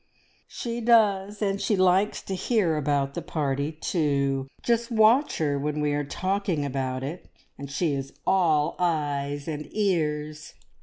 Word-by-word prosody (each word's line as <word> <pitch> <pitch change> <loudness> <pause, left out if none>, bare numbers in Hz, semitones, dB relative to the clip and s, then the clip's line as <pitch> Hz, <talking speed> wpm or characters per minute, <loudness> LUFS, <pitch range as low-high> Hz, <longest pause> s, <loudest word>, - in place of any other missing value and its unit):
"She 235 0 -5
does, 210 -3 +3
and 195 -1 0
she 210 - +1
likes 185 +2 +2
to 195 - -5
hear 190 -3 +1
about 140 -2 0
the - - -4
party, 140 -1 -2
too! 140 -4 0 0.2
Just 235 0 +1
watch 230 +5 +4
her 145 -3 0
when 150 +1 -2
we 150 -1 +1
are 145 0 0
talking 185 0 -1
about 130 -1 -3
it, 155 +7 -6 0.3
and 140 0 -8
she 145 +2 0
is 135 -1 -4
all 160 -5 +2
eyes 145 -4 -1
and 150 -1 -4
ears. 155 -7 -1
155 Hz, 150 wpm, -26 LUFS, 145-195 Hz, 0.3 s, watch